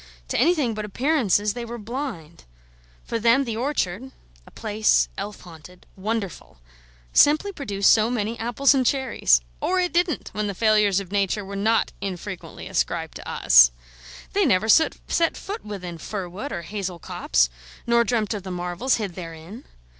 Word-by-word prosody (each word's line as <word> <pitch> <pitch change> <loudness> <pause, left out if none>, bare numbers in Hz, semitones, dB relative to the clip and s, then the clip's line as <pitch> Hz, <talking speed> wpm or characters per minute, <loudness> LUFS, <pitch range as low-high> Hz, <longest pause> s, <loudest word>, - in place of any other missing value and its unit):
To - - 0
anything 290 -5 +2
but 215 0 -4
appearances 210 - +1
they 240 - -5
were 235 +1 -6
blind. 220 - -6 0.6
For 230 - -3
them 235 +4 +4
the 230 -4 -4
orchard 250 -2 -2 0.4
(a - - -12
place 215 0 +1
elf 205 +1 -6
haunted, 175 +1 -14
wonderful!) 200 - -4 0.6
simply 305 +8 +5
produced 205 - +2
so 220 0 +3
many 230 -2 -2
apples 245 +4 +3
and 265 -2 +2
cherries: 250 - +2 0.2
or 370 0 0
it 360 -1 0
didn't, 345 -2 0
when 210 +1 -3
the 200 - -4
failures 210 -2 +3
of 195 -2 -9
Nature 200 0 0
were 200 +1 -7
not 220 +3 +1
infrequently 190 -1 -6
ascribed - - -2
to - - -9
us. - - +6 0.6
They - - +3
never 185 +4 +2
set 320 +8 +5 0.4
foot 405 +2 -6
within 180 -5 -7
fir 195 +1 -5
wood 205 +11 -7
or 170 - -4
hazel 185 0 -5
copse, - - +1 0.4
nor 235 0 +4
dreamt 230 -3 0
of 210 - -4
the 190 - -8
marvels 180 +7 -1
hid 205 -5 -4
therein. 170 +6 -9
210 Hz, 160 wpm, -24 LUFS, 185-245 Hz, 0.6 s, us